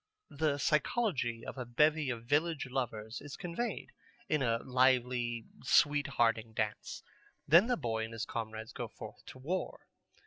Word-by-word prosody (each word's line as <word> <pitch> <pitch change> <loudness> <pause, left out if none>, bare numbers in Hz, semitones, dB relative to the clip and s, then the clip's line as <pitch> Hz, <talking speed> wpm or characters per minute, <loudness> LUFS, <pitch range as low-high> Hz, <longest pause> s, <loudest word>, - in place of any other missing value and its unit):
The 145 -1 +1
psychology 145 - 0
of 130 - -6
a 125 - -3
bevy 150 +3 +3
of 120 -3 -3
village 150 +3 +1
lovers 120 -3 -3
is 145 -1 -8
conveyed 195 +7 -4 0.4
in 155 -2 +1
a 115 -3 +2
lively 125 -2 +2 0.2
sweet 145 -1 +4
hearting 115 -4 +1
dance. - - -3 0.4
Then 170 +9 +7
the 245 - +1
boy 115 -5 -1
and 110 - -9
his 115 0 -3
comrades 110 -1 -5
go - - -4
forth - - -11
to - - -10
war. 165 +9 -3
130 Hz, 150 wpm, -33 LUFS, 115-150 Hz, 0.4 s, Then